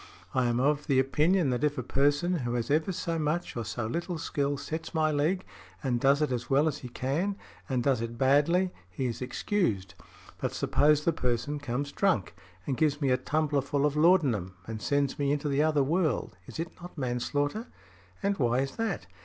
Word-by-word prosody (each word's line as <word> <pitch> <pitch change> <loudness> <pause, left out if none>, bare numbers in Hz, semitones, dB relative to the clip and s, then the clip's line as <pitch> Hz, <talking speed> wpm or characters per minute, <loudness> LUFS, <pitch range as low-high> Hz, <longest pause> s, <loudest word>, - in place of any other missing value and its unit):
I 130 -2 +2
am 120 0 +1
of 145 +3 +1
opinion 145 +4 +3
that 125 +3 -1
if 150 -1 +1
a 125 - -2
person 145 +8 +2
who 120 -4 -2
has 120 +2 -2
ever 155 +6 +2
so 165 -2 -2
much 155 +3 -1
or 120 - -2
so 110 +1 -3
little 170 +9 -3
skill 145 -2 -1
sets 160 +4 -5
my 155 -1 +3
leg 160 +6 0 0.4
and 125 -3 +1
does 140 +4 +4
it 150 - 0
as 120 -1 -3
well 140 +3 +4
as 150 -1 -1
he 125 - -8
can 145 +12 -1 0.3
and 125 -2 0
does 130 -4 +2
it 115 0 -4
badly, 150 +8 +3 0.2
he 110 +8 -3
is 120 0 -3
excused; 125 - -1 0.5
but, - - -2
suppose 150 0 +3
the 170 - +3
person 125 +4 -1
comes 140 +1 -3
drunk, 185 - +1 0.3
and 135 - -1
gives 150 -2 +2
me 140 -4 +1
a - - +5
tumbler 150 +2 0
full 140 +1 0
of 150 0 +1
laudanum, 145 - +3
and 110 0 -6
sends 140 +2 0
me 140 -1 +1
into 145 0 0
the 140 0 +2
other 150 -2 +3
world, 155 - 0
is - - -8
it 165 0 -3
not 175 -1 -10
manslaughter? 145 - -1 0.6
And 200 -2 0
why 120 0 +2
is 135 0 -4
that? 225 0 -2
145 Hz, 200 wpm, -29 LUFS, 125-155 Hz, 0.6 s, a